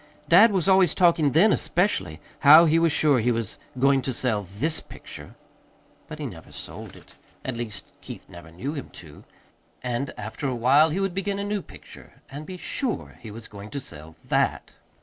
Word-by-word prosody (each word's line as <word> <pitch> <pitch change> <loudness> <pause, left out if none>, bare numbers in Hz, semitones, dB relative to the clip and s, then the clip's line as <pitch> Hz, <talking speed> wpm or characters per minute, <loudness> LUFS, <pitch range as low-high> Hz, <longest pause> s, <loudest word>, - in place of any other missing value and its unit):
Dad 205 +7 +7
was 190 -3 0
always 190 -4 +4
talking 170 -5 +3
then, 195 +7 +5
especially, 190 +4 -1 0.2
how 155 +3 +8
he 165 +1 +3
was 165 -1 +3
sure 145 -3 +3
he 120 +2 +1
was 115 -3 -4 0.2
going 135 +1 +3
to 130 -1 -3
sell 115 -5 0
THIS 100 - -3
picture. - - -12 0.7
But - - -8
he - - -5
never - - -9
sold - - -9
it. - - -17 0.3
At 130 - -3
least, 115 -4 -7
Keith - - -10
never 85 -2 -12
knew 120 - -5
him 140 -4 -7
to. 75 -3 -12 0.6
And 125 +2 -2
after 110 +7 -5
a 130 - -2
while 135 +7 +4
he 165 +5 -2
would 195 -2 -1
begin 195 +1 -2
a 200 - -3
new 205 0 -2
picture, - - -15 0.2
and 145 +2 -8
be 185 - -7
SURE 245 +6 -4
he 110 - -10
was 110 +1 -9
going 100 0 -10
to 140 - -5
sell 80 - -10
THAT. - - 0
140 Hz, 190 wpm, -25 LUFS, 115-175 Hz, 0.7 s, how